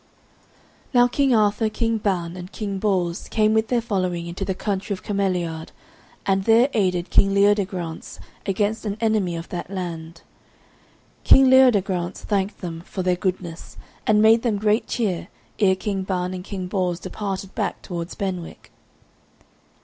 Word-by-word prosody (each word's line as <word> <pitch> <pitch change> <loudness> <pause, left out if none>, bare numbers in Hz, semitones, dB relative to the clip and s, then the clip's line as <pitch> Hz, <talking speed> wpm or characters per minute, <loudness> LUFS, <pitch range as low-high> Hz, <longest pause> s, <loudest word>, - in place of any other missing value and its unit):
Now 245 0 +6
King 275 +2 +1
Arthur, 215 +1 +2
King 225 +1 -1
Ban, 180 -4 -1
and 180 +1 -8
King 200 -3 -4
Bors 185 -4 0
came 215 -1 +2
with 220 0 +2
their 240 0 +1
following 185 -6 -2
into 170 +3 -5
the 190 -1 -2
country 200 +1 -2
of 185 - -15
Cameliard, 180 -5 -1 0.6
and 195 0 +1
there 235 +4 +5
aided 185 -4 0
King 195 0 +4
Leodegrance 195 -5 0 0.3
against 205 +3 0
an 205 -1 -3
enemy 215 -6 +1
of 165 0 -7
that 175 -1 -5
land. 170 -3 -6 1.0
King 265 -1 +6
Leodegrance 200 -9 +3
thanked 200 -1 -1
them 165 -3 -5
for 185 +2 -5
their 180 0 +2
goodness, 180 -2 -4 0.3
and 215 0 +4
made 225 +1 +6
them 230 -4 0
great 210 +2 +1
cheer 195 -8 -1 0.3
ere 190 -3 +4
King 195 0 -3
Ban 185 -1 -2
and 180 -1 -6
King 190 -2 -5
Bors 180 -2 -1
departed 195 0 -5
back - - -3
towards 170 -1 -5
Benwick. 185 -4 -5
195 Hz, 150 wpm, -23 LUFS, 180-215 Hz, 1.0 s, Now